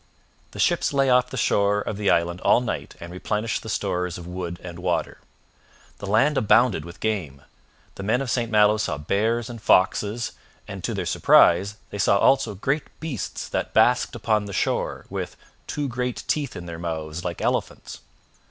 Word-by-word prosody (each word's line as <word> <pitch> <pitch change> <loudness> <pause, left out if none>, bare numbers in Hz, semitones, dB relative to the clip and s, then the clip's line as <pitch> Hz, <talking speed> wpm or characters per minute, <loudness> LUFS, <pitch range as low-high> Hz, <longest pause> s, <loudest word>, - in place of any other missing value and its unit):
The - - -13
ships - - +1
lay 135 -1 +3
off 125 0 +4
the 130 - -6
shore 100 -2 +2
of 105 - -4
the 105 0 0
island 85 +1 +1
all - - +4
night 125 - -4
and 85 0 -9
replenished 105 +5 -2
the 110 - -8
stores 90 -3 -2
of 90 - -9
wood 90 -1 -5
and 85 -1 -8
water. 90 -1 -2 0.8
The 100 - -6
land 120 +9 +3
abounded 110 -4 +3
with 85 +1 -11
game; 85 -12 -3 0.5
the - - -9
men 110 +5 +1
of 135 -3 -3
St 120 -2 0
Malo 105 0 +5
saw 105 - -2
bears 110 +9 0
and 115 -2 -8
foxes, 105 +3 +2 0.4
and, - - -7
to - - -2
their - - -2
surprise 95 +4 +4 0.2
they 100 - -6
saw 100 - +4
also 125 -2 +3
great 135 +9 -1
beasts 150 - -5
that - - -3
basked 120 +2 +3
upon 110 -2 0
the 100 - -7
shore, - - -1
with - - -4 0.3
'two 145 -1 -2
great 125 -1 -3
teeth 145 -7 -1
in 90 - -7
their 85 -1 -7
mouths 80 0 -4
like 85 -2 -4
elephants.' - - -2
105 Hz, 180 wpm, -24 LUFS, 90-120 Hz, 0.8 s, Malo